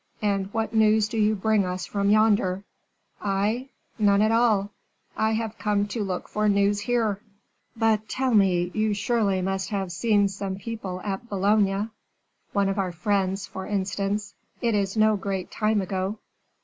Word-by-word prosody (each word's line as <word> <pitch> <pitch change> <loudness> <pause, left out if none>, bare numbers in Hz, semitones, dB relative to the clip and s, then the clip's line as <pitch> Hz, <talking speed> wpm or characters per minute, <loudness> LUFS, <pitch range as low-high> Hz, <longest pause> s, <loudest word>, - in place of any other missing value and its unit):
And 200 -1 0
what 225 +1 -2
news 220 -1 +4
do 225 0 -3
you 215 0 +3
bring 215 0 +2
us 180 0 -3
from 200 -1 -1
yonder?" 205 -3 +3 0.6
"I? 210 +6 -1 0.3
None 205 -1 +4
at 215 - +3
all. 220 -3 +2 0.4
I 220 0 +1
have 225 0 -3
come 205 -1 +1
to 220 -1 -2
look 185 -2 -4
for 210 0 0
news 200 0 +2
here." 215 -2 0 0.6
"But, 220 -1 +1
tell 260 -1 0
me, 180 -4 +3
you 215 -1 +1
surely 205 -4 +1
must 190 0 -2
have 195 -3 -2
seen 205 +3 +2
some 195 -1 -4
people 200 -3 -6
at 205 +4 -5
Boulogne, 200 +1 +1 0.6
one 200 -1 +1
of 195 +1 -1
our 185 -2 0
friends, 195 +2 -1
for 190 - -7
instance; 200 +1 -2 0.3
it 235 -2 +1
is 200 0 0
no 215 -1 +4
great 195 -1 -4
time 215 -1 +1
ago." 190 +2 -2
205 Hz, 160 wpm, -25 LUFS, 195-220 Hz, 0.6 s, news